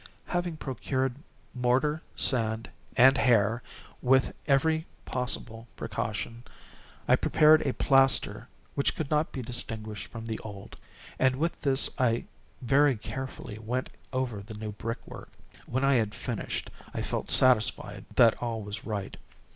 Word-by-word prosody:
Having 175 -2 -2
procured 130 -1 -2 0.4
mortar, 130 +5 +1
sand, 115 -2 +1 0.3
and 130 +2 +7
hair, 115 -1 +3 0.4
with 130 +1 +3
every 160 +3 +2 0.2
possible 120 -2 -2
precaution, 115 +2 -4 0.6
I - - +6
prepared 155 0 +5
a 130 - +1
plaster 135 -5 +3 0.3
which 140 - +1
could 155 -2 -4
not 150 +1 +1
be 130 - -5
distinguished 110 -3 -3
from 115 -1 -8
the 110 -1 -4
old, 100 -2 -9 0.4
and 130 0 +3
with 165 +5 -2
this 135 -2 +5
I 120 -2 +2 0.4
very 135 +1 +4
carefully 130 -2 -6
went 125 +4 -3 0.2
over 130 -6 -2
the 105 +2 -10
new 105 0 -5
brickwork. 115 +3 -7 0.4
When 130 +3 -1
I 140 - +4
had 110 -4 +1
finished, - - -4 0.2
I - - -2
felt - - -3
satisfied 125 -4 +4
that 115 -2 +5
all 115 -3 -3
was 100 0 -6
right. 105 -3 -4
125 Hz, 135 wpm, -28 LUFS, 110-135 Hz, 0.6 s, and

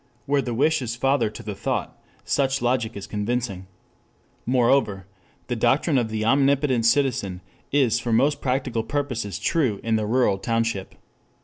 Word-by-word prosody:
Where 140 0 +2
the 120 -3 -4
wish 155 +5 +2
is 120 -2 -3
father 135 -1 +1
to - - -10
the 105 - -4
thought - - -3 0.3
such 135 -1 +1
logic 120 -3 0
is 100 - -6
convincing. 105 -3 -3 0.8
Moreover, 120 -6 +2 0.4
the 125 - -3
doctrine 135 +5 +2
of 115 -2 -2
the 110 0 -2
omnicompetent 135 0 +2
citizen 115 -8 +1 0.3
is 130 -5 +3
for 120 0 -3
most 135 +6 +2
practical 130 -3 -1
purposes 115 - -3
true 130 -12 0
in 115 -1 +1
the 105 -1 -2
rural 115 -4 +2
township. 115 -3 -2
120 Hz, 150 wpm, -24 LUFS, 110-135 Hz, 0.8 s, is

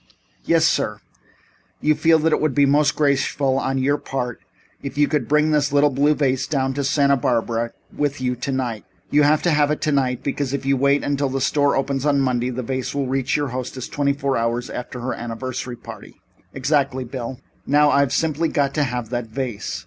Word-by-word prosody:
"Yes, - - +3
sir. - - 0 0.8
You 155 - +3
feel 160 +2 +4
that 160 +1 +1
it - - +1
would 155 -4 0
be 145 - +5
most 145 +1 +3
graceful 140 -2 +1
on 135 0 -1
your 140 +2 +1
part 125 -3 -4 0.4
if 140 0 -7
you 145 0 +4
could 145 -7 -1
bring 150 +1 +3
this 150 -2 +2
little 145 0 +4
blue 145 +3 +2
vase 135 -2 0
down 135 -3 0
to 140 +1 -2
Santa 140 0 +3
Barbara 115 -2 -1 0.2
with 145 -1 -1
you 125 -1 -1
tonight. 125 -3 -3 0.3
You 150 - +4
have 150 +1 +3
to 175 - +2
have 150 -1 +3
it 150 - -1
tonight, 135 -4 0
because 140 -1 -2
if 140 - -5
you 135 0 +3
wait 140 +2 +2
until 140 -1 0
the 135 +1 -2
store 145 +1 +2
opens 135 0 -1
on 145 -1 +2
Monday 125 -2 0
the 130 0 -4
vase 130 +2 -3
will 140 -1 0
reach 135 +1 0
your 145 -2 -1
hostess 130 0 -5
twenty 145 -3 0
four 140 -1 -1
hours 115 +1 -1
after 125 0 -6
her 125 +1 -2
anniversary 120 +1 -5
party." 120 - -12 0.3
"Exactly, 135 -1 0
Bill. 125 0 -6 0.3
Now, 145 +1 +4
I've 140 -2 +3
simply 160 +1 0
got 140 -1 0
to 150 - +1
have 125 -3 -3
that 120 -2 -2
vase. 120 -2 -4
135 Hz, 200 wpm, -21 LUFS, 125-145 Hz, 0.8 s, be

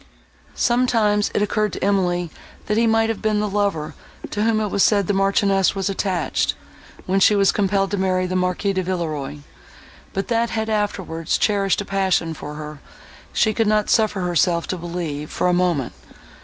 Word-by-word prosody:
Sometimes 230 -4 +2
it 210 - +2
occurred 210 0 0
to - - -5
Emily, 180 -4 +1 0.3
that 210 - 0
he 230 +1 +3
might 225 0 +2
have 225 - -3
been 215 -1 +1
the 210 - 0
lover, 195 -7 -1 0.4
to 205 - -2
whom 220 0 +2
it 210 -1 -1
was 200 - 0
said 200 -1 +4
the 205 - 0
Marchioness 195 0 +2
was 195 0 -1
attached, 190 -2 -1 0.5
when 190 +1 +1
she 210 +2 +5
was 195 -1 +4
compelled 195 -1 0
to 205 - -1
marry 185 -1 +1
the 185 0 -3
Marquis 180 +2 0
de 190 - 0
Villeroi; 155 -6 -3 0.7
but 195 - -3
that 235 -1 +1
he - - -5
had 220 0 -2
afterwards 190 -6 -1
cherished 200 -2 +1
a - - -6
passion 190 -4 0
for 150 -1 -8
her, 150 -1 -8 0.5
she 215 -2 +2
could 225 -1 +1
not 210 0 +2
suffer 215 -4 +2
herself 175 -1 +1
to - - -3
believe, 170 -4 -5
for - - -2
a 180 - +2
moment. 175 -8 0
195 Hz, 185 wpm, -21 LUFS, 175-210 Hz, 0.7 s, she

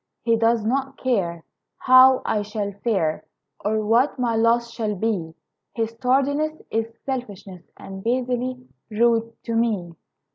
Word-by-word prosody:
He 230 -1 +3
does 225 -1 +2
not 270 +3 -1
care 180 -10 -1 0.3
How 255 0 +6
I 210 - 0
shall 205 -1 -4
fare, 185 -9 0 0.4
Or 215 +1 0
what 235 +7 +2
my 240 -3 0
loss 230 +1 +2
shall 215 -3 -2
be; 185 -6 -2 0.4
His 225 -1 -2
tardiness 285 +5 +1
Is 225 +1 -1
selfishness 205 -8 -6 0.2
And 190 0 -9
basely 250 +1 -2 0.2
rude 230 +1 +2
to 230 - -3
me. 210 -7 0
230 Hz, 135 wpm, -23 LUFS, 210-250 Hz, 0.4 s, How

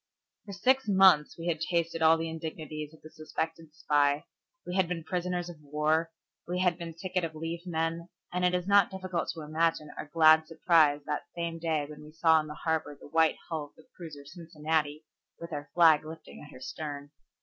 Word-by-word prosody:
For 200 - -7
six 260 +5 +2
months 190 -6 +5
we 165 - -7
had 165 -2 -1
tasted 165 -1 -1
all 160 0 +6
the 165 0 -3
indignities 155 -2 -6
of 160 - -19
the 155 - -12
suspected 160 0 -5
spy, 145 -1 +2 0.4
we 180 - -5
had 190 -2 +3
been 165 -1 -4
prisoners 180 +1 -2
of 170 -3 -10
war, 150 +3 0 0.4
we 180 +1 -2
had 180 -1 +1
been 165 -1 -7
ticket 185 +1 -2
of 160 -1 -4
leave 165 +3 -5
men, 165 +1 -2 0.2
and 180 0 -1
it 180 0 +3
is 180 -1 -1
not 200 -2 +5
difficult 185 -2 -3
to 160 - -7
imagine 155 0 0
our - - -5
glad 160 0 +5
surprise 160 -3 +3
that 150 - -3
same 170 -1 -3
day 160 -3 0
when 150 0 -11
we 150 0 -13
saw 160 0 +4
in 155 - -4
the 150 - -7
harbor 160 -3 -2
the - - -13
white 160 0 +3
hull 160 -3 -3
of 145 - -21
the 160 - -20
cruiser 150 -5 -10
Cincinnati 155 -1 -3 0.3
with 170 0 -8
our 145 -1 -5
flag 160 -3 +6
lifting 160 +1 -10
at 150 - -12
her 130 - -13
stern. 145 0 -6
160 Hz, 205 wpm, -29 LUFS, 155-170 Hz, 0.4 s, all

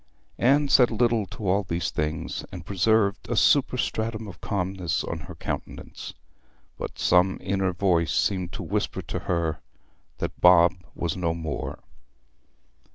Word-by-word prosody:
Anne 140 +4 +4
said 125 -3 +6
little 115 -2 +1
to 100 +3 -6
all 95 +3 +3
these 85 -3 -2
things, 75 +2 -3
and 85 -2 -8
preserved 100 +2 +1
a - - 0
superstratum 110 0 +1
of 100 - -11
calmness 95 -3 -2
on 85 - -4
her 75 - -10
countenance; - - -6 0.6
but - - -6
some 90 +2 +3
inner 95 -1 0
voice 85 -3 +1
seemed 90 -4 0
to - - -6
whisper - - -2
to - - -4
her 85 -2 0 0.6
that - - -5
Bob 90 -1 +7 0.2
was 85 -2 -2
no 85 -3 -1
more. 80 -2 -5
90 Hz, 140 wpm, -26 LUFS, 85-105 Hz, 0.6 s, Bob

